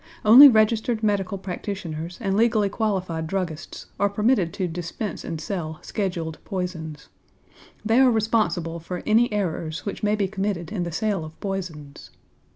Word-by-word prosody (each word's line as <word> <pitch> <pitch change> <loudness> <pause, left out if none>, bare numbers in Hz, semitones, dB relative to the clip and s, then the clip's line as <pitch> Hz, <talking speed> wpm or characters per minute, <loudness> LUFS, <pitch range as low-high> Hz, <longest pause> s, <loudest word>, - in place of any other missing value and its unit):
Only 250 +7 +11
registered 220 -1 +2
medical 200 -2 0
practitioners 180 -3 -5
and 195 -4 -1
legally 215 -2 +3
qualified 185 -7 -2
druggists 175 -3 -4
are 200 +1 +3
permitted 205 -3 +1
to 185 - -2
dispense 175 +3 -5
and 165 -2 -5
sell 160 -3 -4
scheduled 175 -6 -3
poisons. 165 -5 -5 0.8
They 225 +3 +3
are 265 -1 +6
responsible 210 -7 0
for 180 +2 -6
any 225 +2 +3
errors 165 -6 -3
which 200 - -5
may 210 0 +2
be 200 -2 0
committed 190 -4 -3
in 205 -4 -2
the 170 - -4
sale 200 0 -1
of 155 0 -11
poisons. 170 -8 -6
195 Hz, 150 wpm, -24 LUFS, 165-215 Hz, 0.8 s, Only